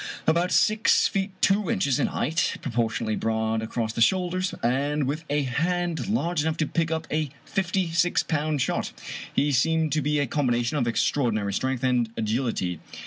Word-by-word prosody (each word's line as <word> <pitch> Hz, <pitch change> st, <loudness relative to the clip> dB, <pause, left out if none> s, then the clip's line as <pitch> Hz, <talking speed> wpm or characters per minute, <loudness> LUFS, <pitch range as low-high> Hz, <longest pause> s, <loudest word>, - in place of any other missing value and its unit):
About 170 Hz, +3 st, +2 dB
six 215 Hz, +1 st, +4 dB
feet 195 Hz, 0 st, -1 dB
two 200 Hz, +1 st, +3 dB
inches 190 Hz, -, +1 dB
in -, -, +2 dB
height, 155 Hz, +6 st, -1 dB
propor 120 Hz, -3 st, 0 dB
tionately 110 Hz, 0 st, -2 dB
broad 110 Hz, 0 st, 0 dB
across 110 Hz, 0 st, -3 dB
the 115 Hz, -, -3 dB
shoulders, 185 Hz, +4 st, +1 dB
and 140 Hz, +5 st, +1 dB
with 150 Hz, +5 st, -2 dB
a 145 Hz, 0 st, +1 dB
hand 170 Hz, +6 st, -1 dB
large 175 Hz, -7 st, 0 dB
enough 160 Hz, +1 st, -1 dB
to 155 Hz, -, +1 dB
pick 165 Hz, +2 st, -1 dB
up 160 Hz, 0 st, -2 dB
a 155 Hz, -1 st, 0 dB, 0.2 s
fifty 185 Hz, -2 st, -1 dB
six 175 Hz, +1 st, +2 dB
pound 150 Hz, -3 st, 0 dB
shot, -, -, -2 dB, 0.4 s
he 145 Hz, +1 st, +1 dB
seemed 160 Hz, +4 st, +2 dB
to 155 Hz, -, +1 dB
be 150 Hz, +2 st, 0 dB
a 145 Hz, -, +2 dB
combination 120 Hz, -1 st, 0 dB
of 120 Hz, -4 st, 0 dB
extraordinary 115 Hz, -4 st, 0 dB
strength 130 Hz, +4 st, -1 dB
and 125 Hz, -3 st, +2 dB
agility. 110 Hz, -, -1 dB
145 Hz, 175 wpm, -25 LUFS, 120-170 Hz, 0.4 s, six